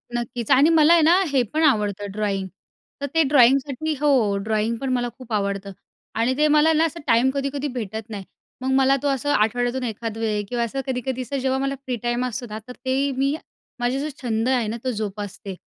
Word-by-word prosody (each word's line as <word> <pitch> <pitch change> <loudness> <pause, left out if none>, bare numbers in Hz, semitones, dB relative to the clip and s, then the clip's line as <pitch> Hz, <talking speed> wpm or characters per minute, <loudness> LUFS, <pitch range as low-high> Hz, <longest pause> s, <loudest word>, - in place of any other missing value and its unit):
नक्कीच. 240 0 -3
आणि 275 +4 +6
मला 325 0 +6
आहे 340 - +5
ना, 340 +5 +5
हे 270 -2 +3
पण 315 +1 +1
आवडतं 210 -8 +1
ड्रॉईंग. 200 -2 -2 0.5
तर - - -1
ते 325 - +5
ड्रॉईंगसाठी 275 +2 +3
हो, 255 -9 +3
ड्रॉईंग 220 +2 0
पण 270 +3 -4
मला 245 -1 0
खूप 250 -3 -9
आवडतं 200 -1 -2 0.5
आणि 245 +3 +2
ते 305 +1 +4
मला 305 +1 +4
ना, 320 +1 +3
असं 330 +1 -4
टाईम 240 +2 +4
कधी-कधी 280 +1 -2
भेटत 220 -2 -5
नाही. 205 -3 -6 0.4
मग 260 +1 -1
मला 270 0 +4
तो - - +1
असं 275 0 -1
आठवड्यातून 245 +4 +1
एखाद 225 -1 -4
वेळी 215 -2 -1
किंवा 235 +3 -2
असं 250 +4 -3
कधी-कधी 255 0 -2
असं 255 +3 -4
जेव्हा 265 0 0
मला 275 0 -1
फ्री 265 -2 -5
टाईम 240 +1 0
असतो 250 0 -4
ना, 210 - -5
तर 250 - -8
ते 270 +2 +1
मी, 275 +2 +1 0.4
माझा 245 +2 0
जो 300 +2 -2
छंद 230 -1 0
आहे 250 -4 +1
ना, 225 +2 -3
तो 260 - 0
जोपासते. 205 -3 -5
250 Hz, 205 wpm, -23 LUFS, 220-275 Hz, 0.5 s, आणि